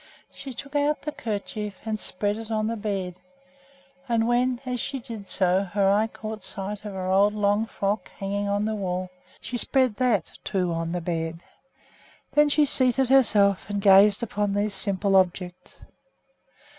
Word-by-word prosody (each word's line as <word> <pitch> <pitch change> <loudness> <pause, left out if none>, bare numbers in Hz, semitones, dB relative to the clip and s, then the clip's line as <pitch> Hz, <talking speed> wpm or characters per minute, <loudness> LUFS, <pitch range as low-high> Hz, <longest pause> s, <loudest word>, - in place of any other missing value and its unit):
She 275 - -9
took 280 +3 -9
out 290 0 +1
the 300 - -3
kerchief 210 -4 -5
and 215 -1 -2
spread 205 +1 -2
it 225 0 -8
on 215 -1 0
the 230 +1 -1
bed; 195 -4 -3 1.0
and 230 -1 +2
when, 245 +1 +1
as 250 -1 -2
she 275 - -3
did 230 -6 -9
so, 185 0 +2
her 200 0 0
eye 210 +2 +3
caught 220 -1 -7
sight 200 +2 -4
of 205 - -5
her 190 -1 -4
old 200 +2 +4
long 205 +1 +1
frock 205 0 -2
hanging 200 0 -3
on 205 +1 0
the 220 - -1
wall, 185 -3 -3 0.3
she 245 +1 -4
spread 255 -5 +1
that, 235 -9 0
too, 180 -4 -1
on 165 0 -2
the 175 0 -2
bed. 165 -1 -3 0.9
Then 295 0 +4
she 295 +1 +4
seated 260 -1 +2
herself 210 -8 +4
and 205 0 -1
gazed 200 +2 +6
upon 205 -2 -1
these 205 0 0
simple 195 0 0
objects. 180 -1 0
205 Hz, 170 wpm, -25 LUFS, 195-230 Hz, 1.0 s, gazed